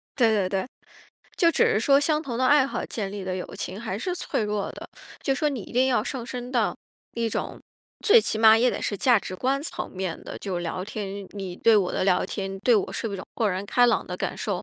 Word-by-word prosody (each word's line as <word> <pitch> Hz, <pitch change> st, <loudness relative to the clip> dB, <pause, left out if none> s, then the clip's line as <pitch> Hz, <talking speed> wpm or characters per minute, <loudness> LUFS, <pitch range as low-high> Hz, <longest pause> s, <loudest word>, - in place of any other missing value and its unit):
对， 240 Hz, -4 st, +4 dB
对， 190 Hz, -3 st, +1 dB
对。 190 Hz, +3 st, -1 dB, 0.7 s
就 335 Hz, -3 st, +4 dB
只 -, -, +3 dB
是 210 Hz, -, +2 dB
说 275 Hz, +4 st, +5 dB
相 300 Hz, +1 st, +1 dB
同 245 Hz, -6 st, -4 dB
的 260 Hz, -, +3 dB
爱 290 Hz, 0 st, +6 dB
好 275 Hz, -, -3 dB
建 200 Hz, -4 st, -4 dB
立 200 Hz, -1 st, -6 dB
的 185 Hz, 0 st, -2 dB
友 180 Hz, -, -4 dB
情 185 Hz, -, -5 dB
还 205 Hz, -4 st, -4 dB
是 360 Hz, +10 st, -2 dB
脆 350 Hz, -, -2 dB
弱 210 Hz, -1 st, -2 dB
的， -, -, -10 dB, 0.3 s
就 270 Hz, -, 0 dB
说 300 Hz, +3 st, +1 dB
你 275 Hz, -5 st, -3 dB
一 -, -, -12 dB
定 255 Hz, +2 st, +3 dB
要 240 Hz, -5 st, +2 dB
上 255 Hz, -3 st, -4 dB
升 245 Hz, +1 st, -6 dB
到 235 Hz, -5 st, +1 dB, 0.4 s
一 230 Hz, -1 st, 0 dB
种， -, -, -4 dB, 0.5 s
最 455 Hz, +2 st, +8 dB
起 220 Hz, -, -2 dB
码 220 Hz, 0 st, +8 dB
也 245 Hz, +2 st, +3 dB
得 -, -, -4 dB
是 205 Hz, -, -2 dB
价 240 Hz, +3 st, +4 dB
值 185 Hz, -, -7 dB
观 265 Hz, +8 st, 0 dB
层 315 Hz, -, -5 dB
面 185 Hz, -3 st, -4 dB
的， -, -, -8 dB
就 185 Hz, -3 st, -3 dB
聊 175 Hz, +2 st, -3 dB
天， 210 Hz, -1 st, -5 dB
你 200 Hz, 0 st, -7 dB
你 200 Hz, -1 st, -6 dB
你 175 Hz, -, -7 dB
对 225 Hz, +2 st, +5 dB
我 190 Hz, -3 st, +2 dB
的 -, -, 0 dB
聊 185 Hz, -2 st, +3 dB
天， 195 Hz, 0 st, -4 dB
对 240 Hz, +4 st, +4 dB
我 205 Hz, -, -1 dB
是 225 Hz, -, -3 dB
不 200 Hz, -, -5 dB
是 -, -, -3 dB
一 -, -, -9 dB
种 -, -, -8 dB
豁 220 Hz, -, +1 dB
然 190 Hz, +2 st, -3 dB
开 245 Hz, +4 st, +4 dB
朗 235 Hz, -, +1 dB
的 180 Hz, -, -5 dB
感 -, -, -3 dB
受， 195 Hz, -4 st, -2 dB
220 Hz, 285 characters per minute, -25 LUFS, 195-255 Hz, 0.7 s, 最